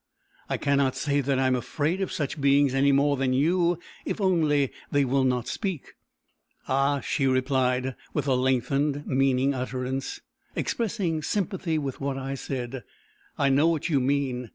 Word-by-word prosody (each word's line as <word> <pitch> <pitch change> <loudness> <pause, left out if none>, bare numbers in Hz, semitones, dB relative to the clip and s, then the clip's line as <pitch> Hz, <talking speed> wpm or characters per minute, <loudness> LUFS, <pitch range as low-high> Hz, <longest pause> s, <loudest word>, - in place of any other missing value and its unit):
"I - - 0
cannot 140 -2 +1
say 145 0 0
that 135 0 0
I 135 - +2
am 130 -1 +3
afraid 155 +8 -1
of 190 - -2
such 145 0 -3
beings 140 -1 +4
any 140 +1 +3
more 140 +1 +3
than 130 -1 +1
you 170 +5 +2 0.3
if - - -3
only 155 -8 +2 0.2
they 145 -1 +3
will 135 +1 +2
not 125 -2 0
speak." 190 -9 -4 0.7
"Ah!" 135 +1 +1
she 135 +3 0
replied, 130 0 +1 0.2
with - - -2
a 135 - +2
lengthened, 135 +3 +1
meaning 135 0 +2
utterance, 130 +1 -3 0.4
expressing 195 -8 -1
sympathy 185 -1 -1
with 140 -3 -4
what 135 -1 -2
I 135 0 -4
said; 130 -1 -5 0.6
"I 140 - +2
know 140 +4 +4
what 165 0 0
you 145 -4 +3
mean. 130 -2 -1
140 Hz, 160 wpm, -26 LUFS, 130-145 Hz, 0.7 s, beings